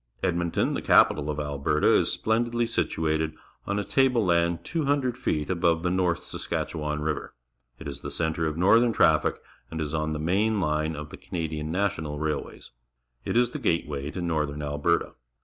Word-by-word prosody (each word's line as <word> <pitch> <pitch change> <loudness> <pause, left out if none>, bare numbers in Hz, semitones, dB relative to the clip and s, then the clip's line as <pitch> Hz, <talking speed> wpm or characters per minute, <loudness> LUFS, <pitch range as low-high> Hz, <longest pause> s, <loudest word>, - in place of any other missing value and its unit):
Edmonton, 85 -2 0
the - - -2
capital 75 0 +4
of 75 0 -2
Alberta, 75 +1 0
is - - +3
splen 110 +2 +1
didly 120 0 0
situated 80 -5 -1 0.3
on 100 - -1
a 105 - 0
table 125 -2 +2
land 85 -1 +1
200 140 -6 0
feet 80 - -1
above 85 -2 +1
the 90 - +1
North 90 -2 +1
Saskatchewan 75 -2 -3
River. 75 0 -3 0.4
It 80 - -8
is 70 0 -6
the 70 - -5
centre 80 +2 -1
of 75 0 -3
northern 115 +6 +4
traffic 80 -6 +3 0.3
and 80 - -5
is 75 -1 -3
on 80 0 -1
the 75 - -3
main 100 +7 +1
line 75 -2 0
of 75 0 -7
the - - -8
Canadian 80 -2 -4
National 90 -6 -1
Railways. 75 0 -4 0.5
It - - 0
is 120 0 +3
the - - -5
gateway 75 -4 -1
to 90 +3 -5
northern 75 -3 -1
Alberta. 75 +4 0
80 Hz, 175 wpm, -26 LUFS, 75-95 Hz, 0.5 s, capital